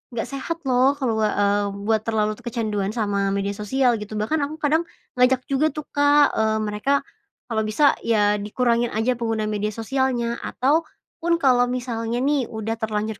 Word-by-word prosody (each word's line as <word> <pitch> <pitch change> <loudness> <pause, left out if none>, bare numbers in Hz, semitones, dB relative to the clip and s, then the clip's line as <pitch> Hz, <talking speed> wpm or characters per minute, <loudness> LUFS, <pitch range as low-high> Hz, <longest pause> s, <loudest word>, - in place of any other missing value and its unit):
"Nggak 225 - -1
sehat 275 +4 -4
loh 255 +1 +4
kalau, 245 -6 -1
eee, 205 -1 +2 0.2
buat 220 -1 +2
terlalu 215 -1 0
kecanduan 215 -4 -2
sama 205 -3 0
media 200 0 -1
sosial," 245 +4 +1
gitu. 210 +1 -7
Bahkan 265 +10 0
aku 290 +2 -4
kadang 310 +3 +2 0.4
ngajak 255 +1 +4
juga 275 +3 +2
tuh, 305 -1 -7
Kak, 290 0 +4
eee, 220 0 +1
mereka 210 +6 -1 0.6
kalau 220 -1 +1
bisa 280 +7 +3
ya 210 -2 +3
dikurangin 235 +3 0
aja 235 +2 0
penggunaan 220 -2 -1
media 210 0 -2
sosialnya. 240 0 -1
Atau, 305 +5 0 0.3
pun 340 +1 +2
kalau 250 -5 +3
misalnya 240 -1 -2
nih 280 -3 +1
udah 225 +1 -4
terlanjur 215 -1 -2
230 Hz, 165 wpm, -23 LUFS, 215-265 Hz, 0.6 s, loh